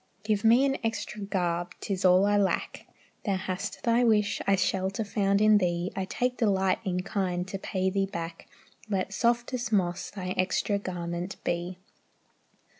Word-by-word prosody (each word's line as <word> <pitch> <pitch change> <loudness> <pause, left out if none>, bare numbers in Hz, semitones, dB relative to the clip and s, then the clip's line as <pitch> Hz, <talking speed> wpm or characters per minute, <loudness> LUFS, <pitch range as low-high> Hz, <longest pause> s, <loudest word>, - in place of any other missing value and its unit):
Give 210 -1 0
me 235 +4 +6
an 275 0 +1
extra 220 -1 -3
garb, 175 -3 -2
'tis 195 -2 -3
all 185 +1 +6
I 205 0 +3
lack." 200 -2 0 0.4
"Thou 200 -3 0
hast 190 +2 -4
thy 235 +1 +3
wish, 210 -3 +2
I 195 - +5
shelter 190 +2 0
found 200 -1 +1
in 215 -1 +6
thee, 175 0 -1
I 190 - -2
take 250 +5 -1
delight 195 -4 +2
in 180 -3 -1
kind 185 -3 -2
to 195 - -4
pay 190 -1 -1
thee 195 0 0
back. 165 -2 -6 0.4
Let 195 -1 -1
softest 240 +1 0
moss 180 -4 0
thy 185 -3 -6
extra 185 +2 0
garment 175 -1 -4
be." 175 +1 -2
195 Hz, 160 wpm, -28 LUFS, 185-210 Hz, 0.4 s, me